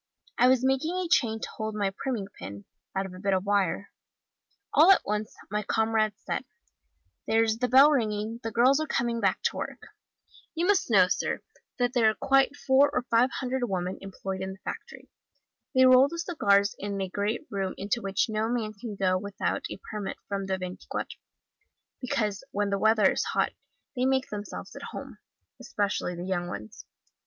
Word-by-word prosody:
I 250 - +6
was 260 0 +4
making 270 +6 +1
a 370 -1 -1
chain 230 -9 +2
to - - -3
hold 220 -1 -3
my 200 -2 0
priming 240 -6 -3
pin, 100 +3 -8 0.3
out 195 0 0
of 190 - -8
a 185 - -10
bit 195 0 +1
of 190 +1 -1
wire: 200 -1 0 0.8
all 320 +5 +7
at 390 - +4
once, 210 +1 -2 0.2
my 210 0 0
comrades 220 0 0
said, - - -2 0.8
'there's 225 0 +2
the 250 - +1
bell 270 +4 +7
ringing, 220 -3 -1
the 225 - -3
girls 250 +5 +4
are 310 - -2
coming 235 -2 0
back 195 -4 +1
to - - 0
work.' - - -6 0.7
You 335 +2 0
must 395 0 +2
know, - - +6
sir, - - -1 0.4
that 245 -1 +1
there 230 -4 +4
are 215 - -1
quite 270 +1 +3
four 275 +1 +4
or 250 -3 -1
five 235 +3 +5
hundred 255 -2 -2
women 185 -1 -2
employed 195 -1 -5
in 190 0 -4
the 190 - -15
factory. - - -7 0.7
They 260 0 +7
roll 255 +1 +7
the 335 - -7
cigars 200 - +2
in 200 0 -3
a 190 - -1
great 205 +9 -2
room 195 -2 -2
into 205 +5 -1
which 195 -2 0
no 220 0 -1
man 225 -3 -2
can 215 0 -7
go 185 -1 +1
without 200 0 -3
a - - -7
permit 210 -3 -4
from 195 -1 -3
the 190 0 0
Veintiquatro, 185 0 -6 0.8
because 225 -7 -2
when 205 0 -1
the 200 - 0
weather 220 -2 +4
is - - 0
hot - - 0 0.4
they 250 0 +1
make 265 0 +1
themselves 210 0 -7
at - - -8
home, - - -8 0.4
especially 205 -6 -2
the 175 +1 -6
young 175 -2 -1
ones. 105 -6 -8
215 Hz, 185 wpm, -28 LUFS, 195-255 Hz, 0.8 s, all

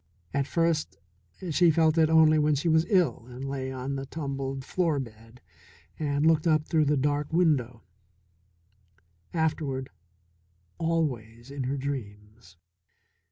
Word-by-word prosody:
At 140 -1 0
first 165 -2 0 0.5
she 175 +3 +4
felt 160 0 +3
it 160 -2 +4
only 160 -1 +5
when 150 0 +3
she 145 +5 -2
was 160 0 +3
ill 180 - +2
and 125 +2 -7
lay 135 -1 -4
on 130 +1 -4
the 135 0 -6
tumbled 135 -3 -4
floor 165 -4 0
bed 115 -1 -10 0.6
and 145 -1 0
looked 160 0 +3
up 155 -1 +2
through 155 -2 +2
the 145 0 +2
dark 145 +2 0
window; 140 -9 +1 1.5
afterward 150 -5 -2 0.9
always 130 -8 -2
in 140 -2 -4
her 135 +2 -2
dreams. 105 -8 -7
145 Hz, 130 wpm, -27 LUFS, 130-160 Hz, 1.5 s, only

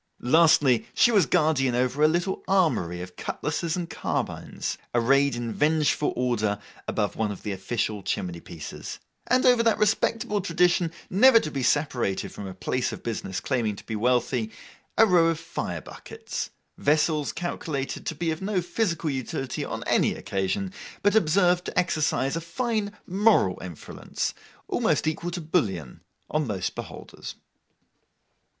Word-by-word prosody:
Lastly, 145 -3 +5
she 240 - +5
was 200 -9 +4
guardian 150 -7 +2
over 130 +3 0
a 155 - +7
little 175 +4 0
armoury 155 - +1
of 90 0 -9
cutlasses 165 - -2
and 175 -2 -3
carbines, - - -3 0.2
arrayed 135 +3 +3
in 120 -1 -3
vengeful 150 -1 +2
order 115 -4 0 0.3
above 105 -2 -1
one 110 -2 -1
of 100 - -8
the 105 - -3
official 105 +2 -2
chimney 90 -2 -3
pieces; 85 -3 -8 0.3
and 255 +1 +3
over 245 -2 +6
that 230 -2 +3
respectable 215 0 +1
tradition 175 -1 +2 0.2
never 230 +5 +7
to 155 - -4
be 135 - -2
separated 125 -7 0
from 100 - -7
a 95 - -8
place 125 +7 -1
of - - -8
business 105 -5 -3
claiming 115 -6 -1
to - - -12
be 110 - -4
wealthy—a 120 - 0
row 175 -5 +5
of 165 -1 0
fire 90 - -4
buckets—vessels 150 - -2
calculated 155 -5 -4
to 160 - -2
be 165 +1 -1
of 160 - -4
no 195 0 0
physical 175 -4 -1
utility 130 0 -3
on - - -4
any - - +2
occasion, 100 - -2 0.3
but 205 - +4
observed 180 -2 +3
to - - -6
exercise 155 -5 +1
a 165 - -2
fine 215 +4 -2
moral 195 - +3
influence, 90 -4 -5 0.3
almost - - +1
equal 160 +2 -1
to 175 0 -4
bullion, 100 - -1 0.3
on 155 -2 -1
most 100 -5 -2
beholders. - - -8
150 Hz, 145 wpm, -26 LUFS, 115-180 Hz, 0.3 s, a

